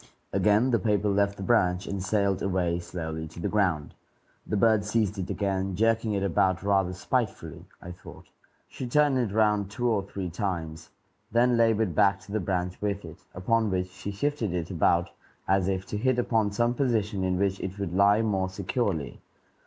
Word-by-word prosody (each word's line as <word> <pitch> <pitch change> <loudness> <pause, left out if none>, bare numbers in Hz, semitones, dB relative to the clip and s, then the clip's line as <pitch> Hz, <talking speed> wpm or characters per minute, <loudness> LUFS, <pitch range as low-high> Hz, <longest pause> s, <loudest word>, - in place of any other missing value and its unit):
Again 105 +6 +3
the 115 - +3
paper 105 +1 +1
left 100 0 +1
the 100 - -6
branch, 95 -5 +2
and 100 -1 -4
sailed 100 -1 0
away 90 -3 0
slowly 80 -2 -5
to 80 +2 -12
the - - -1
ground. 90 -8 0 0.5
The 105 - -1
bird 110 -1 +4
seized 105 -1 0
it 90 - -4
again, 95 -2 -1
jerking 115 +1 +1
it 100 -1 -1
about 95 0 +1
rather 95 -2 +2
spitefully, 90 - -3 0.2
I 90 - -7
thought; 90 +2 -12 0.4
she 130 - -6
turned 145 +1 +3
it 115 -5 -1
round 105 -2 +2
two 120 +4 -2
or 110 -4 +2
three 95 -2 -6
times, 85 -4 -4 0.4
then 120 +2 +3
labored 110 -5 +2
back 100 +5 +3
to 95 - -13
the 110 - 0
branch 90 -1 -2
with 100 -2 -2
it, 80 -1 -11 0.2
upon 110 +4 +1
which 90 -1 -2
she 100 - -7
shifted 110 -3 -2
it 85 -2 -3
about - - +2 0.4
as 95 0 +2
if 95 -1 -1
to 105 - -4
hit 130 +3 +1
upon 110 -4 +1
some 120 +4 +1
position 110 -7 0
in 90 -1 0
which 95 0 0
it 95 +1 -5
would 100 -4 -4
lie 100 +3 +4
more 95 -4 0
securely. 95 - -2
100 Hz, 185 wpm, -27 LUFS, 95-110 Hz, 0.5 s, bird